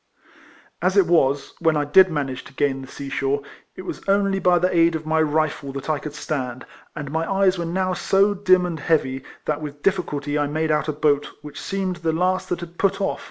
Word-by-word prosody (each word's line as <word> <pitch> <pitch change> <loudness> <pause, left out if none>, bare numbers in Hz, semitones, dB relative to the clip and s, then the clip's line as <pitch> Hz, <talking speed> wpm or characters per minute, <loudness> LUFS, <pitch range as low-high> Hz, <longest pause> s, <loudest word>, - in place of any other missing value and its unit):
As 185 +3 +1
it 195 - +6
waSj 145 -5 +2
when 160 -2 +2
I 145 - 0
did 185 +6 +6
manage 140 -5 -3
to - - -14
gain 135 -1 0
the 130 - -9
sea 140 +1 -8
shore, 140 +1 -1 0.3
it 185 - -8
was - - -6
only 195 0 +2
by 180 -1 +4
the 180 +1 +1
aid 165 0 +4
of 155 0 -4
my 160 0 +2
rifle 155 -2 0
that 140 +3 -3
I 150 - 0
could 150 0 -7
stand, 130 -4 -4 0.3
and 145 -2 -6
my 165 +3 -1
eyes 195 -2 +2
were 170 - -2
now 185 +2 0
so 195 +3 +2
dim 185 -2 +3
and 170 -3 -4
heavy 135 -4 0 0.2
that 150 0 -1
with 145 -1 -8
difiiculty 150 -6 0
I 145 - +1
made 155 +2 -1
out 150 0 +1
a - - +1
boat 145 -1 +1
which 150 -1 -8
seemed 190 -2 -2
the 165 -2 -1
last 185 +3 0
that 175 - -2
had 170 0 -10
put 195 -1 +2
oif. 195 0 -2
160 Hz, 225 wpm, -22 LUFS, 145-185 Hz, 0.3 s, it